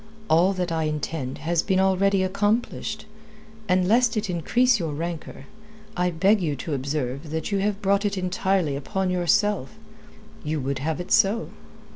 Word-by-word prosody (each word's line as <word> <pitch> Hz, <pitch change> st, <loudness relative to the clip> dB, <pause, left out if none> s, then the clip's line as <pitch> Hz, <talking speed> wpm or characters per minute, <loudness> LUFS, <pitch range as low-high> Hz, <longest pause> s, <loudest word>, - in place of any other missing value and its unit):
"All 175 Hz, +5 st, +4 dB
that 180 Hz, -2 st, -2 dB
I 160 Hz, -1 st, 0 dB
intend 150 Hz, -3 st, -3 dB
has 170 Hz, 0 st, +2 dB
been 190 Hz, -1 st, +1 dB
already 190 Hz, 0 st, +3 dB
accomplished. 215 Hz, +2 st, -1 dB, 0.6 s
And 180 Hz, 0 st, +3 dB
lest 230 Hz, +1 st, +3 dB
it 205 Hz, -3 st, -1 dB
increase 235 Hz, +8 st, +2 dB
your 160 Hz, -4 st, -3 dB
rancour, 165 Hz, -2 st, -6 dB, 0.5 s
I 180 Hz, 0 st, +1 dB
beg 190 Hz, +5 st, +3 dB
you 155 Hz, -4 st, -1 dB
to 145 Hz, +3 st, -5 dB
observe 140 Hz, +1 st, -3 dB
that 160 Hz, +4 st, -3 dB
you 200 Hz, -, +1 dB
have 205 Hz, +1 st, -1 dB
brought 200 Hz, +1 st, +2 dB
it 200 Hz, -1 st, -1 dB
entirely 185 Hz, -4 st, 0 dB
upon 185 Hz, +7 st, -2 dB
yourself. 180 Hz, -3 st, +1 dB, 0.7 s
You 150 Hz, +1 st, -2 dB
would 135 Hz, 0 st, -2 dB
have 155 Hz, +4 st, -2 dB
it 180 Hz, -, -7 dB
so." 215 Hz, +4 st, +3 dB
180 Hz, 160 wpm, -24 LUFS, 155-200 Hz, 0.7 s, All